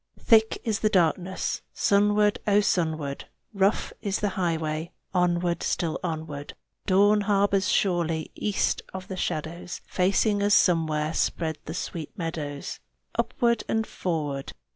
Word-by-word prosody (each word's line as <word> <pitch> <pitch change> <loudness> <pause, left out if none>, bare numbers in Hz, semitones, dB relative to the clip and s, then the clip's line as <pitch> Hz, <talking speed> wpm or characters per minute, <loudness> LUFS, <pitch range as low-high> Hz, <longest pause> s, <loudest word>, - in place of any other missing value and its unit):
Thick 220 -1 +4
is 220 -2 0
the 215 - +2
darkness 185 0 +1
Sunward, 205 +1 +3
O, 205 0 +5
sunward! 160 -8 -1 0.3
Rough 195 0 +1
is 200 -2 -1
the 205 - 0
highway 165 -3 -2 0.2
Onward, 175 -1 +1
still 165 -3 -1
onward! 155 -4 -5 0.3
Dawn 205 +2 +5
harbors 200 -1 +2
surely 170 -4 +1
East 205 -2 0
of 190 0 -6
the 190 - -4
shadows. 170 0 -4
Facing 200 +3 +2
us 205 0 +4
somewhere 155 -3 +2
Spread 160 -1 -1
the 160 - -5
sweet 165 -3 -4
meadows. 155 -5 -4 0.3
Upward 235 -3 +1
and 220 0 +1
forward! 150 -9 -3
180 Hz, 125 wpm, -26 LUFS, 160-205 Hz, 0.3 s, O